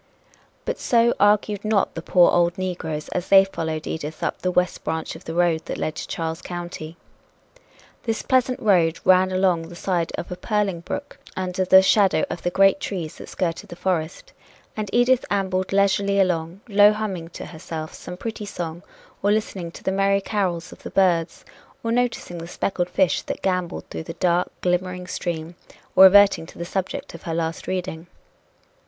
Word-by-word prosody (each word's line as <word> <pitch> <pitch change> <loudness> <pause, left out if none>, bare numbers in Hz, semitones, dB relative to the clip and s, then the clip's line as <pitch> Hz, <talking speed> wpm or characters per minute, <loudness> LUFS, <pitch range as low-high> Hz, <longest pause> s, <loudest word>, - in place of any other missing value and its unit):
But - - -3
so 235 0 +3
argued 205 0 +3
not 215 -2 +1
the 165 - -5
poor 175 +1 +5
old 175 0 +2
negroes, 170 -5 -4
as 180 +1 -3
they 195 0 +8
followed 160 -4 -4
Edith 155 0 -5
up - - -2
the 185 - 0
west 180 0 0
branch 160 0 -3
of 165 - -12
the 165 - -5
road 170 -2 +2
that - - -4
led 155 - -2
to - - -5
Charles 165 -1 -4
County. 175 -2 -7 1.0
This 225 -2 -2
pleasant 255 -1 +2
road 175 -7 +3
ran 185 0 +5
along 185 -3 +1
the 175 - -10
side 175 -2 -1
of 175 - -6
a - - -3
purling 205 -3 -1
brook 285 +11 -6 0.2
under 185 0 -1
the 190 +1 +7
shadow 190 -5 +4
of - - -5
the 175 - 0
great 195 +7 +4
trees 180 - -5
that - - -10
skirted 170 -2 -3
the - - -8
forest, 170 -3 -3 0.4
and 215 -2 -3
Edith 245 +1 +3
ambled 190 -2 -1
leisurely 200 0 +2
along, 175 0 0
low 205 0 +6
humming 195 -6 -4
to - - -7
herself 160 -1 -7
some 180 - -9
pretty 215 +1 -5
song 170 -3 -5 0.4
or 205 - +2
listening 200 -5 -1
to - - -13
the 190 - 0
merry 195 +1 +2
carols 185 -5 -2
of - - -13
the - - -7
birds 175 -3 +1 0.4
or 230 - -1
noticing 235 -7 -1
the 165 - -7
speckled 175 0 -2
fish 185 -6 +2
that - - -6
gamboled 180 -2 -1
through - - -4
the 165 - -6
dark, 180 0 +1
glimmering 180 0 -1
stream 170 -2 -4 0.4
or 190 - +10
reverting 195 -3 +6
to - - -14
the 170 - -4
subject 185 +1 -4
of 170 - -10
her 165 - -4
last 165 -1 -3
reading. 180 -3 -4
180 Hz, 185 wpm, -23 LUFS, 170-200 Hz, 1.0 s, or